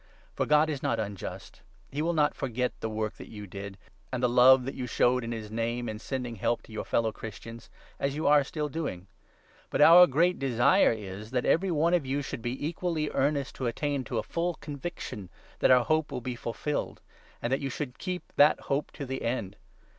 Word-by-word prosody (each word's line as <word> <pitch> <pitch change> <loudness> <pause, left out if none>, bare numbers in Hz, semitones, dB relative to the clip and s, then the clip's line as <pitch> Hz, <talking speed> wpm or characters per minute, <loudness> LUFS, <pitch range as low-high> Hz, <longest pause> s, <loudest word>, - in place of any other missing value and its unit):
For - - -1
God 150 +1 +5
is 145 -3 -3
not 115 - 0
unjust; 100 -3 -6 0.3
he 145 - -2
will 170 +2 +1
not 150 -2 +2
forget 125 0 -2
the - - -3
10 110 - -6
work 110 0 -1
that - - -10
you 105 -1 -8
did, 100 +1 -8 0.3
and 130 -1 -3
the - - +5
love 125 +1 +6
that 135 - -4
you 125 -1 -5
showed 125 +2 +2
for 115 - -4
his 110 -2 -5
Name, 115 +2 -2
in 110 -1 -5
sending 125 -2 -4
help 120 +5 0
to - - -16
your 110 - -5
fellow 115 -1 +1
Christians 115 +2 -9 0.2
— - - -27
as 140 0 -1
youare 150 -1 +4
still 150 +2 -3
doing. 145 - -4 0.6
But - - -2
our 175 +3 +9
great 170 +6 +2
desire 135 - +4
is 105 -1 -6
that 125 0 -1
every 190 +4 +2
one 165 +1 +2
of 175 -4 +3
you 140 +2 -1
should 120 - -6
be 125 +5 -3
equally 165 -2 -2
1 - - -11
1 - - +2
earnest 140 -1 0
to 130 - -2
attain 140 +3 -1
to - - -3
a - - 0
full 170 0 -2
conviction 140 - -7 0.3
that - - +4
our 125 -2 +6
hope 155 -1 +1
will 125 - -3
be 125 0 -4
fulfilled, 120 +5 -3 0.4
and 120 - -1
that 135 - 0
you 135 - -2
should 130 0 -5
keep 180 -1 -4
that 145 +1 +6
hope 140 +2 -1
to 140 - -6
the 130 0 -4
end. 115 -5 -2
130 Hz, 220 wpm, -28 LUFS, 115-150 Hz, 0.6 s, our